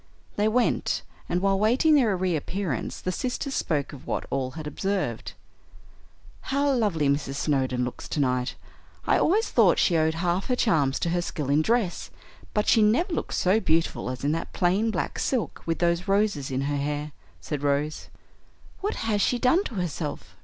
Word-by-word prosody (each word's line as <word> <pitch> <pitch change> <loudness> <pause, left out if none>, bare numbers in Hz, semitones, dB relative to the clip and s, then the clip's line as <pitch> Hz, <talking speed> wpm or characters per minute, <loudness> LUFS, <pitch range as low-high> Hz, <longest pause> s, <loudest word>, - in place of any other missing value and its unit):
They 210 +1 +2
went, 240 +3 +1 0.3
and 175 +1 0
while 195 -1 +2
waiting 250 +9 +4
their 230 -10 +4
reappearance 180 - -2
the 185 - -2
sisters 255 +6 -3
spoke 145 - -1
of 135 - -11
what - - -2
all 130 -2 -1
had 155 - -6
observed. 150 - -2 1.2
"How 280 +1 +2
lovely 200 - +1
Mrs. 140 -1 0
Snowdon 130 -4 0
looks 125 - -7
tonight. 125 -3 0 0.5
I - - +3
always 420 +7 +2
thought - - +5
she 175 - +3
owed 160 0 +2
half 175 +2 -1
her 250 - +1
charms 150 - +2
to 170 - 0
her 175 0 +1
skill 150 -5 -3
in 145 +2 +4
dress, 220 -1 0 0.5
but 210 - +1
she 225 - +5
never 305 - +3
looked - - -2
so 190 +4 +3
beautiful 165 - 0
as 125 0 -6
in 145 - +2
that 165 +1 -3
plain 190 +6 +2
black 220 - -2
silk, 250 -5 -1
with 165 - 0
those 170 +1 +1
roses 195 -8 +1
in 130 0 -1
her 145 +1 -1
hair," 145 +1 -3 0.3
said 135 - -4
Rose. 145 +2 -1 0.7
"What 410 +2 -2
has 210 -2 +1
she 245 - +2
done 265 +10 +3
to 230 - -6
herself?" 170 -4 -4
175 Hz, 175 wpm, -26 LUFS, 145-215 Hz, 1.2 s, thought